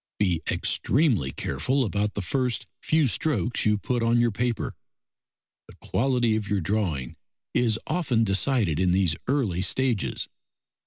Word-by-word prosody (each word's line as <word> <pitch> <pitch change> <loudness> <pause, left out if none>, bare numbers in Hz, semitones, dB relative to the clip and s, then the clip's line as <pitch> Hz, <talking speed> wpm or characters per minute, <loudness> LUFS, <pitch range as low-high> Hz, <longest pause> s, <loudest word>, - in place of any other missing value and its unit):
Be 90 -5 +1
extremely 125 - +1
careful 125 - -1
about 105 0 -1
the 105 - -2
first 125 +3 -1 0.2
few 155 -2 +2
strokes 120 - 0
you 105 0 +3
put 120 +3 -2
on 115 +1 +3
your 120 -1 +3
paper: 120 +1 -2 0.9
the - - -15
quality 120 -3 +1
of 110 -1 -2
your 100 -1 0
drawing 85 - -2 0.4
is 115 -3 +2
often 150 -9 +1
decided 100 - +1
in 90 -1 +2
these 90 -4 +2
early 120 -10 0
stages. 125 0 0
110 Hz, 140 wpm, -26 LUFS, 95-125 Hz, 0.9 s, you